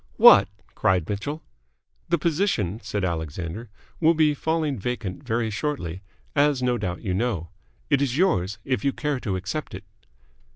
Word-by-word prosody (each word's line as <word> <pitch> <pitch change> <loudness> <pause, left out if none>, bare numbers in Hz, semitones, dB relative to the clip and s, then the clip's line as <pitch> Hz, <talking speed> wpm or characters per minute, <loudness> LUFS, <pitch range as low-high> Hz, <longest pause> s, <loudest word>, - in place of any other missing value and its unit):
"What!" 100 -1 +9 0.3
cried 90 -4 +1
Mitchell. 145 +10 -4 0.7
"The 170 - +3
position," 150 - 0
said 105 -3 -2
Alexander, 85 +5 -4 0.3
"will 165 0 +4
be 155 -1 +4
falling 155 -3 -1
vacant 105 -4 -4
very 115 0 -1
shortly, 100 - -3 0.3
as 145 -3 +3
no 125 -1 +1
doubt 90 -1 -4
you 95 -4 -1
know. 95 -5 -1 0.4
It 140 - +2
is 135 -2 0
yours, 100 - +2
if 130 0 -1
you 140 -1 +1
care 150 -3 -2
to 100 -6 -2
accept 95 +12 -4
it." - - -8
115 Hz, 155 wpm, -25 LUFS, 95-145 Hz, 0.7 s, What